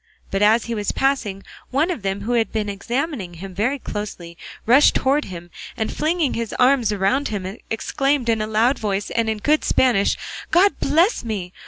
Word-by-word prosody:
But 195 - -1
as 220 +3 +4
he 235 - -3
was 210 -3 -1
passing, 235 -8 -1 0.3
one 300 +7 +1
of 300 - -4
them 195 +1 -2
who 220 +4 -3
had 230 -2 +1
been 215 -2 -2
examining 235 - -3
him 190 +3 -8
very 230 +9 0
closely 200 -8 -6 0.3
rushed 255 +6 +5
towards 280 +3 +1
him, 175 -1 -9 0.3
and 220 -1 -2
flinging 315 -2 0
his 230 -1 -3
arms 250 -3 +3
round 210 +8 +1
him 195 0 -5
exclaimed 270 +3 0
in 225 -2 +2
a 215 - -2
loud 225 +5 +2
voice 205 -2 -2
and 220 -2 -1
good 305 +1 +3
Spanish, 230 -6 +2 0.3
"God 390 +4 +3
bless 330 - +2
me! 195 -6 -4
225 Hz, 180 wpm, -21 LUFS, 200-275 Hz, 0.3 s, rushed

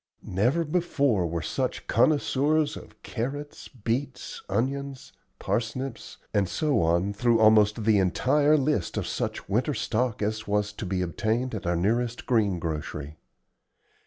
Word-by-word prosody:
Never 120 - +1
before 140 - +1
were 85 -1 -3
such - - -2
connoisseurs 150 +1 +2
of - - -12
carrots, 140 +5 -5
beets, 125 +3 -4
onions, 135 +5 -2 0.3
parsnips, 120 +2 -3 0.2
and 100 -4 +2
so 150 - +1
on 85 +4 +1
through 115 +2 +2
almost 110 0 +5
the 105 -1 +4
entire 145 +11 +3
list 140 - 0
of - - -1
such - - -3
winter 125 +8 0
stock 115 0 -1
as 110 +1 -2
was 105 0 0
to 105 - -6
be 90 0 0
obtained 115 +8 -1
at 95 -5 -4
our 85 - +1
nearest 115 +7 0
green 105 -7 +2
grocery. 75 -2 -5
115 Hz, 135 wpm, -27 LUFS, 100-135 Hz, 0.3 s, almost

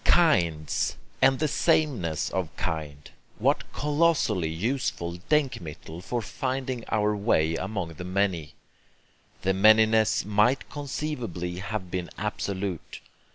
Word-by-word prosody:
Kinds, 85 - +2 0.2
and 135 0 +5
sameness 110 - +1
of 90 -3 -1
kind 75 -3 -4 0.3
what - - +1
colossally 145 - +1
useful 85 -2 -2
DENKMITTEL 85 - -1
for 120 +5 -3
finding 130 0 -3
our 105 -1 +2
way 80 -6 +2
among 95 -1 -3
the 85 - -8
many! 90 -5 -1 0.9
The 95 - +2
manyness 110 +2 +5
might 105 +6 +2
conceivably 125 - -4
have 100 -2 -4
been 90 -3 -3
absolute. 95 -3 -4
100 Hz, 105 wpm, -27 LUFS, 85-125 Hz, 0.9 s, and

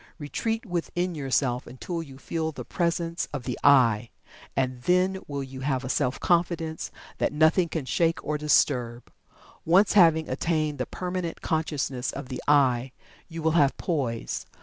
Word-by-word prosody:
Retreat 225 +10 -3
within 175 -1 -2
yourself 135 -4 -1
until 165 +7 -5
you 135 -5 -11
feel 160 +3 -3
the - - -8
presence 170 -1 -1
of 145 -4 -4
the 125 - -3
"I," 120 -5 +5 0.5
and 130 -2 -1
then 185 +5 +2
will 140 -1 -3
you 130 0 -9
have 135 -1 -1
a 125 - -5
Self 135 -2 0
Confidence 170 -2 0 0.3
that - - +1
nothing 160 +3 +3
can 155 -5 -3
shake 165 +4 0
or 150 - -1
disturb. 125 -5 +1 0.5
Once 190 +5 +4
having 165 -5 +5
attained 155 -4 -1
the 125 - -2
permanent 180 -2 -4
consciousness 145 -6 -1
of 135 -2 -7
the 130 - -5
"I," 130 -3 +3 0.3
you 165 -2 -7
will 160 - +3
have 145 -4 +3
poise. 130 -10 -2
150 Hz, 155 wpm, -26 LUFS, 130-170 Hz, 0.5 s, I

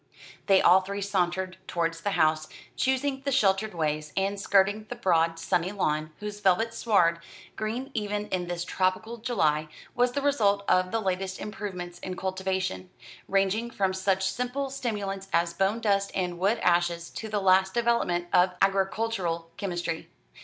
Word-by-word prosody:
They 195 -1 +5
all 185 +2 +7
three 200 +1 -4
sauntered 185 -1 -1
towards 165 -1 -1
the 205 - -1
house, 155 0 +2 0.3
choosing 265 +1 0
the 275 0 -2
sheltered 210 -4 +2
ways, 155 -2 -1
and 195 +1 0
skirting 200 +2 +2
the 245 - -4
broad 165 -7 +2
sunny 180 +2 0
lawn, 155 -6 -1
whose 210 0 -6
velvet 210 +3 +2
sward, 180 -8 +2 0.4
green 240 +6 -3
even 210 -1 -2
in 180 -2 -2
this 175 0 -3
tropical 190 +7 -1
July, 155 -10 +1 0.3
was 245 0 +2
the 280 - -1
result 205 -8 +2
of 185 0 +3
the 225 - 0
latest 190 -1 -2
improvements 180 -4 -6
in 185 - -5
cultivation, 190 0 -2 0.4
ranging 195 +4 +1
from 195 -4 0
such 190 0 +1
simple 250 +7 -2
stimulants 205 -7 -3
as 170 0 +1
bone 195 +5 +1
dust 200 -3 +1
and 180 -2 -2
wood 200 +5 +2
ashes 175 -1 +1
to 220 - -6
the 210 -1 0
last 190 0 +3
development 230 -7 +1
of 180 0 +4
agricultural 195 -3 0
chemistry. 175 -5 -3
195 Hz, 155 wpm, -27 LUFS, 180-215 Hz, 0.4 s, all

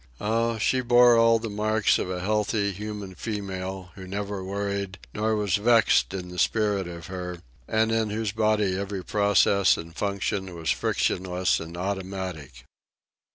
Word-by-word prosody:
Oh, 115 +2 0
she 130 +4 +1
bore 120 0 +6
all 115 0 +5
the 115 0 -5
marks 110 0 +1
of - - -2
the 90 -1 -3
healthy, 105 +1 0
human 105 -1 -6
female, 95 -3 -5
who 95 -1 -10
never 100 0 -4
worried 100 0 -3 0.2
nor 110 +1 0
was 105 -3 +1
vexed 115 -1 +4
in 90 -2 -5
the 90 0 -6
spirit 105 -4 +1
of 85 -1 -8
her, 90 -1 -5 0.3
and 110 +1 +1
in 110 -1 +1
whose 105 0 -2
body 105 -3 +1
every 100 -1 -4
process 100 -1 +3
and 85 0 -9
function 100 -2 -2
was 80 -1 -1
frictionless 90 0 0
and 80 +1 -8
automatic. 95 -8 -5
100 Hz, 155 wpm, -26 LUFS, 95-110 Hz, 0.3 s, bore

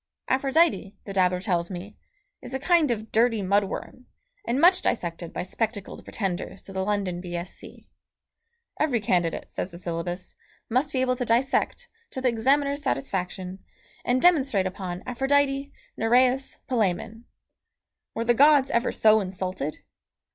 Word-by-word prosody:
Aphrodite, 270 - +2
the 195 - -7
dabbler 180 -1 +2
tells 175 -4 0
me, 190 +2 -7 0.5
is 260 - -7
a - - -1
kind 330 0 +3
of 220 -2 -3
dirty 225 -2 +2
mud 200 +2 +3
worm, 250 +5 -7 0.4
and 250 - +1
much 360 +3 +6
dissected 170 -5 -2
by - - -3
spectacled 210 +2 -4
pretenders 195 -2 -4
to 195 - -10
the 190 0 -1
London 195 -3 -1
B.Sc.; 175 0 -6 1.1
every 275 -7 +2
candidate, 175 -5 0
says - - -3
the 170 - -10
syllabus, 175 +1 -4 0.4
must 265 +5 +1
be 260 - 0
able 255 -1 +2
to 250 - -1
dissect, 265 - +1 0.2
to - - -6
the 260 -1 +2
examiner's 280 +5 +1
satisfaction, 185 - -3 0.4
and 250 +1 +1
demonstrate 275 - +4
upon 185 -1 -5
Aphrodite, 275 +2 +1 0.2
Nereis, 250 +3 +2
Palæmon. 225 -1 -1 0.9
Were 230 - -2
the 240 - +4
gods 285 +1 +5
ever 235 +2 +1
so 220 0 +5
insulted? 185 -6 -4
225 Hz, 140 wpm, -26 LUFS, 185-265 Hz, 1.1 s, much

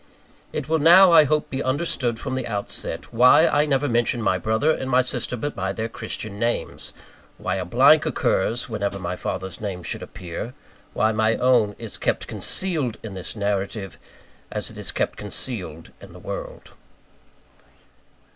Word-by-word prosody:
It - - -4
will 160 +1 +1
now, 175 +4 +8
I 160 -2 +8
hope, 150 +2 0
be 135 - -2
understood 130 -4 -1
from 130 +1 -4
the 130 - -2
outset, 105 +2 -3
why 125 +2 +6
I 150 +1 +2
never 140 0 +1
mention 120 -1 +1
my 95 -5 +1
brother 110 - +1
and 130 -4 -3
sister 125 0 -2
but 145 +5 -4
by 95 0 -2
their 110 0 -3
Christian 110 -2 -5
names; 120 +1 -2 0.5
why - - -2
a 90 - -3
blank 140 - +5
occurs 120 -4 0
wherever 100 -4 -2
my 90 -1 -4
father's 95 +2 -5
name 95 -4 -4
should - - -4
appear; 90 +7 -7 0.4
why 110 - +2
my 110 +1 +2
own 120 -5 +3
is 115 -4 -6
kept - - 0
concealed 155 - 0
in 110 -3 -7
this 95 +2 -6
narrative, 100 -1 -3 0.5
as - - -5
it - - -13
is - - -1
kept - - -2
concealed 90 -10 -5
in - - -13
the - - -11
world. - - -7
115 Hz, 165 wpm, -23 LUFS, 100-135 Hz, 0.5 s, now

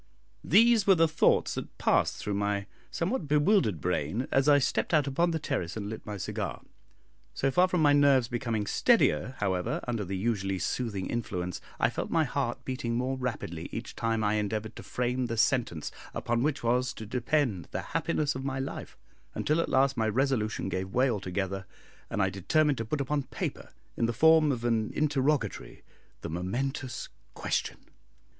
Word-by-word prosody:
These 230 -2 +5
were 195 - +7
the 165 -1 +4
thoughts 160 0 +2
that - - -7
passed - - +2
through 105 - -3
my 100 0 -1 0.2
somewhat 175 - -2
bewildered 150 - +3
brain, 90 - -1
as 135 +2 +3
I 145 - +7
stepped 140 +4 +1
out 150 -3 +3
upon 155 +6 +1
the 165 - 0
terrace 125 - -3
and 105 -1 -4
lit 110 - -8
my 105 -1 -4
cigar. 95 - -4 0.7
So 135 - +1
far 180 +6 +4
from 180 -3 +1
my 145 -1 +6
nerves 140 -4 +5
becoming 115 -3 -2
steadier, 90 +5 +2
however, 95 -3 -1
under 115 -4 -1
the 95 0 -4
usually 95 -2 -1
soothing 100 -2 -2
influence, 90 -6 -3 0.2
I - - +3
felt - - -4
my - - +3
heart - - -2
beating 130 -3 -2
more 130 +2 0
rapidly 105 -10 -4
each 115 +1 -6
time 115 -1 0
I 105 +1 +2
endeavoured 110 +1 -3
to - - -7
frame 125 +5 -1
the 115 -1 -3
sentence 115 - +1 0.2
upon 120 0 0
which 145 -1 0
was 125 +2 +1
to 110 - -8
depend 125 - 0
the - - -4
happiness 145 -2 0
of 130 - -5
my 135 -1 -2
life, 135 0 -5 0.4
until 155 +2 +1
at - - -3
last 135 0 +3
my 110 -1 +1
resolution 115 -4 0
gave 95 0 -3
way 130 +1 +4
altogether, 95 -2 -3 0.4
and 100 - 0
I 95 - +1
determined 145 - +1
to 115 - -2
put 145 +6 -2
upon 145 +2 0
paper, - - -5 0.3
in 115 - +1
the 120 - -1
form 155 +4 +5
of 120 -3 -3
an 115 -2 +1
interrogatory, 145 -6 0 0.4
the - - -5
momentous 125 - -3 0.3
question. - - -2
120 Hz, 180 wpm, -29 LUFS, 105-140 Hz, 0.7 s, were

